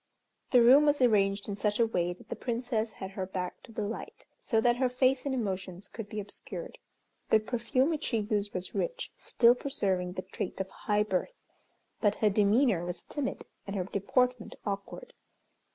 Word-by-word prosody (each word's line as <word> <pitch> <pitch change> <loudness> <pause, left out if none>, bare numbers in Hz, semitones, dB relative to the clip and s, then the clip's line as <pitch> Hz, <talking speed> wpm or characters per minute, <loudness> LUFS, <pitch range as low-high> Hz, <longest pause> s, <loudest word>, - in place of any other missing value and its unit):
The 245 -2 +6
room 275 +5 +7
was 290 0 +3
arranged 200 -5 +3
in 205 - -3
such 210 +1 0
a 230 - +6
way 175 -6 0
that 175 - -12
the - - -3
Princess 235 -2 -2
had 190 0 -7
her 190 -1 -4
back 180 -1 -4
to 235 - -14
the 215 - -3
light 225 - -7
so 225 - +1
that 240 +1 +3
her 255 0 +2
face 255 +2 +2
and 265 - 0
emotions 190 -5 -3
could 225 -3 -8
be 215 - -4
obscured. 210 - -8 0.5
The 220 - +6
perfume 245 +6 0
which 310 - -2
she 230 - 0
used 210 -1 -1
was 180 0 -4
rich, - - -2
still 235 0 +4
preserving 190 -9 -1
the 185 0 -4
trait 185 - -5
of 190 0 -2
high 210 0 +1
birth, 210 - -2 0.6
but 205 -2 +2
her 210 -2 +2
demeanor 210 -1 +3
was 175 0 -5
timid, 285 -3 -4 0.2
and 200 - -4
her 190 - 0
deportment 235 +5 0
awkward. 200 - -5
215 Hz, 185 wpm, -30 LUFS, 195-250 Hz, 0.6 s, room